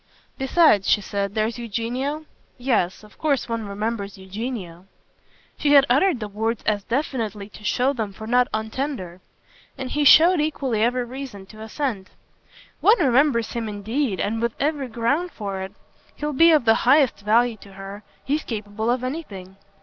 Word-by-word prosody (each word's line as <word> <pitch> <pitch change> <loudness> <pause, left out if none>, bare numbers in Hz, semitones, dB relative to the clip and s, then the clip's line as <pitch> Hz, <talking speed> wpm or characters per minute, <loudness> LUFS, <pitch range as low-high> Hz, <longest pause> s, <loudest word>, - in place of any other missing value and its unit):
"Besides," 265 - +4
she - - +5
said, 200 0 -3
"there's 225 +2 -1
Eugenio? 245 +7 -3 0.3
Yes, 230 -8 0
of 210 - -18
course 290 -4 0
one 230 -2 -3
remembers 200 0 -4
Eugenio." 190 -3 -6 0.7
She 290 -1 +3
had 280 -1 +8
uttered 295 +2 +3
the 215 - -4
words 220 +2 -2
as 205 -2 0
definitely 225 -6 -2
to 210 - -14
show 255 +5 +1
them 220 -6 -3
for 220 +3 -10
not 245 +2 +3
untender; 220 -4 -4 0.6
and 260 -1 -5
he 295 - +1
showed 330 +4 +7
equally 275 -7 -1
every 245 +2 +1
reason 245 -6 -8
to 215 +2 -13
assent. 220 -4 -3 0.7
"One 440 +3 +5
remembers 260 - +2
him 230 -2 -3
indeed, 210 - -2
and 225 +2 -1
with 235 -1 -1
every 285 -2 -1
ground 250 +10 0
for 195 -2 -5
it. 190 0 -6 0.4
He'll 300 0 -3
be 330 +5 +6
of 305 -6 +4
the 225 - +6 0.2
highest 275 -2 +4
value 225 +3 +2
to 200 -1 -15
her 195 +1 -9 0.2
he's 295 +3 0
capable 215 0 -4
of 245 +1 0
anything. 205 - -6
230 Hz, 165 wpm, -23 LUFS, 205-275 Hz, 0.7 s, had